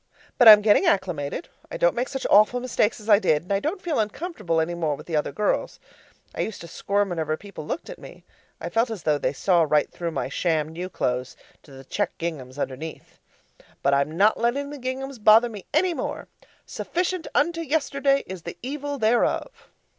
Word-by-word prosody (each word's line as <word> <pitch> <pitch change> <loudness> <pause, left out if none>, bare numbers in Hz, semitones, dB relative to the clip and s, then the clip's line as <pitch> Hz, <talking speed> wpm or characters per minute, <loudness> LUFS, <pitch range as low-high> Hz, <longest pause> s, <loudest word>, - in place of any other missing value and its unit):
But 245 - +7
I'm 210 -1 +10
getting 205 -1 +4
acclimated. 180 - -1 0.2
I - - -5
don't - - +3
make 250 +2 -2
such 270 -1 -5
awful 215 +4 +5
mistakes 240 -2 0
as 215 - -13
I 205 -2 +6
did; 160 -6 +1
and 200 - -3
I 195 - +2
don't 320 - -3
feel 335 -4 -1
uncomfortable 210 - -2
any 160 +2 -1
more 160 -4 -1
with - - -12
the 165 - -3
other 150 -1 0
girls. 210 +9 -1 0.5
I - - -3
used 220 - -4
to 170 - -9
squirm 200 +4 -1
whenever 160 -3 -2
people 200 -6 -10
looked 335 - -4
at - - -9
me. - - -13 0.4
I - - -5
felt 230 +2 +1
as 215 -7 -6
though 150 -2 +1
they 130 - 0
saw 175 +4 +2
right 150 -2 +2
through 170 -1 -4
my 165 - -3
sham 160 -3 0
new 175 +3 -6
clothes 125 -7 -2 0.2
to 145 - -19
the 135 0 -11
checked 205 +9 -3
ginghams 145 -6 -5
underneath. 145 +3 -6 0.6
But 140 - +3
I'm 140 +3 0
not 210 +3 +4
letting 275 +5 0
the 295 - -8
ginghams 260 0 -5
bother 220 +3 +6
me 210 -4 -9
any 350 +4 +2
more. - - -5 0.4
Sufficient 360 0 -3
unto 335 +3 +1
yesterday 280 -3 +1
is 185 -1 -8
the 170 - -8
evil 285 +2 -4
thereof. 240 - 0
205 Hz, 200 wpm, -24 LUFS, 160-270 Hz, 0.6 s, I'm